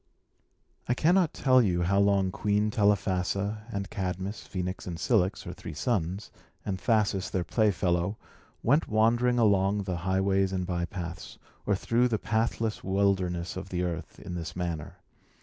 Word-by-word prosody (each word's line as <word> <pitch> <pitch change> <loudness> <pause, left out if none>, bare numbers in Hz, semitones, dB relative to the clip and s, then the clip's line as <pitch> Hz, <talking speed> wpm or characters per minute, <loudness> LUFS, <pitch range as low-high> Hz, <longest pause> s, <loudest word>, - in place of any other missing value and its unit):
I 125 - +3
cannot 175 +3 +3
tell 130 -2 +4
you 90 -6 +1
how 100 +3 +2
long 100 -2 +3
Queen 105 +2 0
Telephassa, 100 +1 0
and 100 -1 -3
Cadmus, 95 +1 -4
Phœnix, 90 0 -4
and 85 -2 -4
Cilix, 95 +2 +1
her - - -6
three - - -8
sons, 95 - -1 0.3
and 95 -2 -2
Thasus, 105 -4 +1
their 95 - -1
playfellow, 95 -1 +1 0.5
went 145 +7 +3
wandering 120 +3 +3
along 100 -2 +3
the 95 -2 -3
highways 95 +2 +1
and 95 -1 -1
bypaths, 85 -2 -5 0.3
or 100 - +3
through 115 +6 +2
the 115 -3 0
pathless 110 0 -1
wildernesses 95 -3 0
of 95 0 -6
the 90 -1 -1
earth, 85 -2 -4
in 90 - -7
this 80 -2 -5
manner. 85 -4 -4
95 Hz, 150 wpm, -28 LUFS, 90-110 Hz, 0.5 s, tell